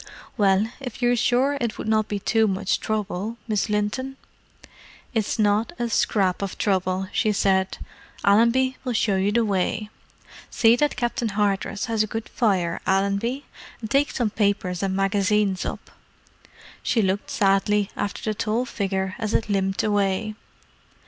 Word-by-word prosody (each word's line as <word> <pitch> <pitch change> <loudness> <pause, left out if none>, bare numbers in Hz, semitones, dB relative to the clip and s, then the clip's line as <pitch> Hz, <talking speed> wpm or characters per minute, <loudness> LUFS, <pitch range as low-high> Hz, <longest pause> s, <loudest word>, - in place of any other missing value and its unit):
"Well, 200 -1 +3
if 250 -5 -7
you're 245 0 +4
sure 260 +4 +2
it 235 -2 -2
would - - -5
not 215 -1 +2
be 205 - -2
too 220 +2 +2
much 195 0 0
trouble, 215 +1 -3
Miss 215 -1 0
Linton——?" 210 +6 -1 1.0
"It's 220 -1 0
not 215 +6 +2
a 240 -1 -2
scrap 195 -4 +1
of 200 -1 -4
trouble," 190 -1 0
she 215 -3 +2
said. 190 -2 +1 0.5
"Allenby 235 +5 +3
will 255 -2 -2
show 215 -3 +1
you 195 +2 +1
the 230 +1 +2
way. 205 +1 -1 0.6
See 230 0 +4
that 295 +4 +1
Captain 240 -1 -1
Hardress 200 0 -1
has 225 -3 0
a 215 - +1
good 225 +1 -5
fire, 185 -8 0
Allenby—and 210 +4 -2
take 280 +3 +3
some 230 -4 -1
papers 200 -4 0
and 190 -1 -1
magazines 195 0 +1
up." - - -6 0.9
She 225 - +1
looked 190 +1 -1
sadly 200 +1 +2
after 200 - -3
the 215 - 0
tall 225 +4 -1
figure 190 -4 -2
as 220 -1 -1
it 225 - 0
limped 195 -1 0
away. 205 0 0
210 Hz, 150 wpm, -24 LUFS, 195-230 Hz, 1.0 s, you're